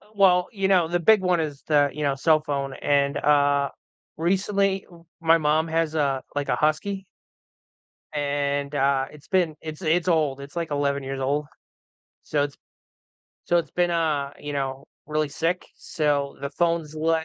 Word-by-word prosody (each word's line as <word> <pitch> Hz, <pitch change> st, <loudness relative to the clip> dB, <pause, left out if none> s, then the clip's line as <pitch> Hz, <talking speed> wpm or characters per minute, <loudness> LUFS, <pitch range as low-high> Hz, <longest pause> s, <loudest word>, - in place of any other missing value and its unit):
Well, 180 Hz, -3 st, +4 dB
you 195 Hz, -4 st, 0 dB
know, 185 Hz, -4 st, +4 dB
the 175 Hz, +1 st, 0 dB
big 210 Hz, +4 st, +5 dB
one 180 Hz, -2 st, +2 dB
is 150 Hz, -3 st, -4 dB
the, 145 Hz, -2 st, +4 dB
you 150 Hz, -, -4 dB
know, 140 Hz, -1 st, +1 dB
cell 155 Hz, +3 st, +3 dB
phone 140 Hz, -3 st, -3 dB
and, 140 Hz, 0 st, +1 dB
uh, 145 Hz, -1 st, +3 dB, 0.5 s
recently 195 Hz, +3 st, +1 dB
w 170 Hz, -2 st, -17 dB, 0.2 s
my 165 Hz, 0 st, +5 dB
mom 155 Hz, +1 st, +1 dB
has 165 Hz, -1 st, 0 dB
a, 140 Hz, -3 st, 0 dB
like, 145 Hz, -1 st, -2 dB
a -, -, +3 dB
husky 190 Hz, +6 st, 0 dB, 1.1 s
and, 145 Hz, -1 st, -1 dB
uh, 135 Hz, -1 st, +2 dB
it's 150 Hz, -1 st, -15 dB
been 175 Hz, -5 st, +1 dB
it's 155 Hz, +1 st, -7 dB
it's 170 Hz, +1 st, +1 dB
old, 155 Hz, -6 st, +2 dB
it's 140 Hz, +2 st, -10 dB
like 170 Hz, -2 st, -3 dB
11 140 Hz, -1 st, 0 dB
years 135 Hz, 0 st, -4 dB
old. 145 Hz, +3 st, 0 dB, 0.8 s
So, 145 Hz, -1 st, 0 dB
it's 145 Hz, -, -6 dB, 0.9 s
so 175 Hz, -, +2 dB
it's 170 Hz, -, -3 dB
been, 175 Hz, 0 st, +1 dB
uh, 155 Hz, -5 st, 0 dB
you 145 Hz, 0 st, -6 dB
know, 135 Hz, -1 st, -3 dB, 0.2 s
really 155 Hz, 0 st, 0 dB
sick, 165 Hz, +5 st, -2 dB
so, 145 Hz, -3 st, -1 dB
the 140 Hz, -, -4 dB
phone's 165 Hz, 0 st, 0 dB
le 160 Hz, +1 st, +1 dB
155 Hz, 170 wpm, -24 LUFS, 140-170 Hz, 1.1 s, big